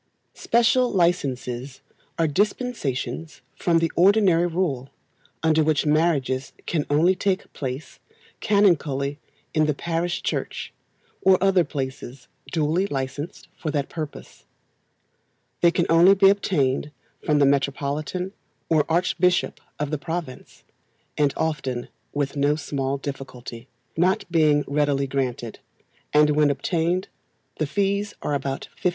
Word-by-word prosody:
Special 240 +2 +3
licences 135 -7 -1 0.4
are 165 - +2
dispensations 155 - -2
from 170 -2 +2
the 165 -1 +1
ordinary 185 -2 +4
rule, 160 -7 -2 0.5
under 160 -1 +4
which 155 -1 +1
marriages 150 -4 +1
can 155 -4 -1
only 160 +6 +4
take 190 +1 -2
place 135 +1 -6 0.4
canonically 150 -9 +2 0.3
in 155 -1 +3
the 150 - +1
parish 170 +2 -2
church, - - -3 0.5
or 190 -1 +5
other 190 -1 +4
places 135 -3 -6 0.2
duly 165 +4 +1
licensed 140 +1 -5
for 160 - -4
that 145 -2 -1
purpose. 155 -3 -7 1.2
They 170 - +6
can 170 0 +1
only 175 +4 +6
be 195 0 +6
obtained 150 -9 0 0.3
from 150 - +2
the 145 - +5
Metropolitan 140 +6 -1 0.4
or 155 -2 +2
archbishop 180 +1 +1 0.2
of 150 0 -3
the 155 - -1
province, 160 -4 -6 0.5
and 145 -2 +2
often 135 -6 -2 0.2
with 145 -1 -2
no 145 +1 +2
small 140 -2 -2
difficulty, 130 -3 -8 0.3
not 185 +3 +2
being 155 -3 +4
readily 145 -1 +1
granted; 125 -4 -3 0.5
and 150 0 +5
when 150 0 +3
obtained 170 +5 0 0.5
the 155 - 0
fees 200 +5 -1
are 150 - -1
about 140 -1 -3 0.2
£50. 180 - +4
155 Hz, 120 wpm, -24 LUFS, 140-175 Hz, 1.2 s, They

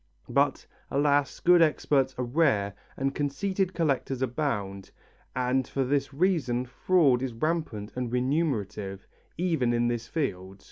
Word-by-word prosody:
But, - - +1 0.2
alas, 145 -1 +1
good 175 0 +5
experts 140 -4 +2
are 125 - -1
rare 120 -8 +2 0.2
and 135 +1 -1
conceited 185 +7 -1
collectors 135 -5 0
abound, 105 -8 -2 0.5
and 125 +1 +1
for 135 - -1
this 140 +2 0
reason 140 -6 +1
fraud 135 0 +2
is 130 -2 -3
rampant 120 -6 -2
and 125 -2 -3
remunerative, 125 - -1 0.3
even 160 -9 +1
in 120 0 +2
this 120 -1 -3
field. 95 - -3
135 Hz, 130 wpm, -28 LUFS, 120-155 Hz, 0.5 s, good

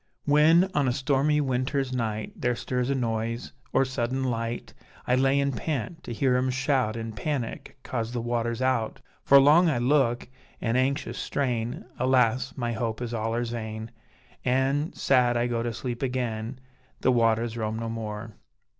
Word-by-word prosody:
When, 155 +5 +5
on 145 -3 +2
a 125 - +2
stormy 140 +3 +2
winter's 130 0 -1
night 110 -4 -2
There 125 0 0
stirs 125 +1 -2
a 140 - +1
noise, 115 -1 -2 0.2
or 135 - +3
sudden 130 0 -2
light, 115 -2 -3 0.3
I 125 - +1
lay 135 +2 +3
an' 140 0 +1
pant, 145 +4 -3
to - - -6
hear 125 +2 +2
'em 130 +1 +1
shout 130 -4 +1
In 115 -1 -4
panic 135 +1 -4
'coz 115 -3 -3
the 120 - -2
water's 120 +1 -1
out; 130 -4 0 0.2
For 140 - +7
long 155 +5 +6
I 150 - +1
look, 125 -1 +2 0.3
an' 115 0 0
anxious 135 +3 0
strain; 120 -4 -2
Alas! 130 0 +2
my 120 -2 -1
hope 115 -1 -2
is 120 -1 -4
allers 115 +1 -1
vain, 110 -1 -5 0.5
An' 135 +5 +1
sad 125 -3 +3
I 120 - +1
go 120 -1 -1
to 120 0 -2
sleep 120 +1 -5
again: 125 -2 -2 0.4
The 130 - +4
waters 115 -1 +2
roam 110 -1 -2
no 115 0 -3
more. 110 -1 -5
125 Hz, 165 wpm, -27 LUFS, 115-135 Hz, 0.5 s, For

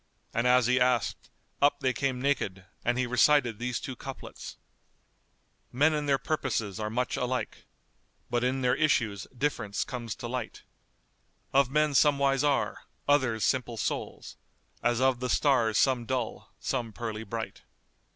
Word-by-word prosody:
and 115 +2 +1
as 125 -1 +5
he 125 +2 +3
asked, 125 -3 +1 0.3
up 145 0 +4
they 130 -1 +1
came 130 +1 -1
naked; 100 -9 -1 0.2
and 120 +1 +1
he 130 - +1
recited 125 -2 +3
these 125 0 -2
two 135 -4 -6
couplets[FN#211]:— 135 +2 -8 1.2
Men 150 +5 +4
in 150 -1 -1
their 140 -1 +4
purposes 110 -9 -2
are 105 0 -2
much 125 +3 -1
alike, 125 0 -3 0.3
* - - -42
But 120 0 +1
in 130 +1 0
their 125 -1 +3
issues 115 -10 +1
difference 120 -6 -2
comes 120 -4 -5
to 120 - -6
light: 120 -2 -5 0.9
Of 135 -1 +4
men 150 +1 +2
some 145 +1 +5
wise 135 0 +2
are, 145 -2 0 0.2
others 130 -6 +2
simple 125 -3 0
souls; - - -4 0.2
* - - -42
As 120 -1 +1
of 130 -1 +3
the 125 0 -3
stars 120 -7 +3
some 125 -2 +2
dull, 130 -3 -3
some 115 -3 -2
pearly 110 -1 -4
bright. 110 +1 -5
125 Hz, 160 wpm, -29 LUFS, 115-135 Hz, 1.2 s, as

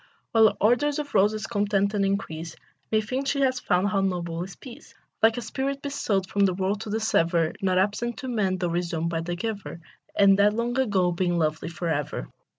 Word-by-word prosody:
While 220 -2 +5
ardors 245 +7 +2
of 295 -1 -5
roses 215 +2 +2
contend 205 -2 0
and 205 -1 +1
increase, 170 -5 -2 0.4
Methinks 255 +6 0
she 280 - 0
has 255 -1 +2
found 185 -1 +1
how 200 -2 +1
noble 175 -3 -2
is 190 +1 -9
peace, 260 +3 -13 0.3
Like 225 +1 +4
a 245 - -3
spirit 275 +1 -3
besought 215 -9 -1
from 200 0 +2
the 185 - -1
world 195 +2 -1
to 220 - -6
dissever, 170 -7 +1
Not 185 -1 +1
absent 210 +5 0
to 270 - -6
men, 205 -6 0
tho' 175 -1 -1
resumed 170 -1 -1
by 165 -1 -1
the 175 +1 -3
Giver, 200 -2 -5 0.4
And 195 -1 +5
dead 205 +1 +4
long 235 +1 -1
ago, 195 -8 +2
being 175 0 0
lovely 155 0 -1
for 170 +1 -5
ever. 145 - -2
200 Hz, 195 wpm, -26 LUFS, 175-225 Hz, 0.4 s, While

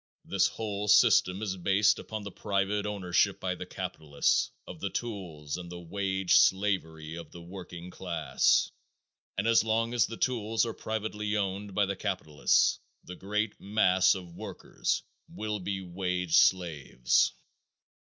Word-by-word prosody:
This - - +2
whole 105 -2 -4
system 105 -3 +5
is 95 -3 -2
based 100 +3 +3
upon 110 -1 -6
the 100 - -7
private 100 +1 -1
ownership 95 -4 +1
by - - -1
the - - -7
capitalist 75 -2 0 0.2
of 90 - -9
the 100 - -2
tools 90 -10 -5
and 90 -1 -8
the 90 - -7
wage 95 +1 +1
slavery 80 -6 +1
of 85 -2 -8
the 85 - -11
working 90 -1 -9
class, 85 -8 +1 0.7
and 95 - 0
as 115 -1 +5
long 115 +1 0
as 120 -5 +3
the 115 - -7
tools 115 -3 0
are 115 - -3
privately 105 -1 -3
owned 100 0 -3
by 105 - +3
the 100 0 -3
capitalists 75 -5 +1 0.2
the 90 - -9
great 105 +3 -2
mass 95 -3 +3
of 90 -3 -8
workers - - -3 0.3
will 105 -1 -4
be 95 +1 -3
wage 90 -1 -1
slaves. 75 -9 +3
95 Hz, 145 wpm, -29 LUFS, 90-105 Hz, 0.7 s, system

